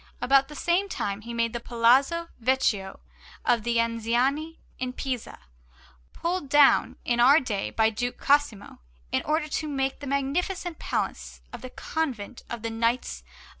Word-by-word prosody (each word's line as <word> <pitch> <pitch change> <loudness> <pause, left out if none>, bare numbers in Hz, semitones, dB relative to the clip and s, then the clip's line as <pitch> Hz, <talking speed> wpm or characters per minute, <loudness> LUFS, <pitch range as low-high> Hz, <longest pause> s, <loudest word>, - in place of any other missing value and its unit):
About 270 +1 +4
the 300 - -11
same 355 +6 +1
time 200 - -3
he 235 +2 -8
made 230 0 -1
the 235 - -2
Palazzo 260 +9 +2
Vecchio 225 -6 0 0.4
of 235 -2 +3
the 235 +2 -1
Anziani 240 +7 0 0.2
in 255 0 -3
Pisa, 255 -3 -4 0.7
pulled 345 -4 -3
down 290 0 +5
in 240 -1 +1
our 270 +6 +7
day 210 -8 -3
by 220 0 +2
Duke 245 +3 -3
Cosimo, 285 -9 +1 0.3
in - - +1
order 305 +1 0
to 310 +1 -3
make 270 -2 -2
the 285 - -7
magnificent 325 +6 -2
Palace - - -3
and 255 - -9
Convent 255 -8 -3
of 235 -2 -6
the 230 - -2
Knights 230 - -1
of - - -31
S. 65 - -24
255 Hz, 160 wpm, -26 LUFS, 230-290 Hz, 0.7 s, our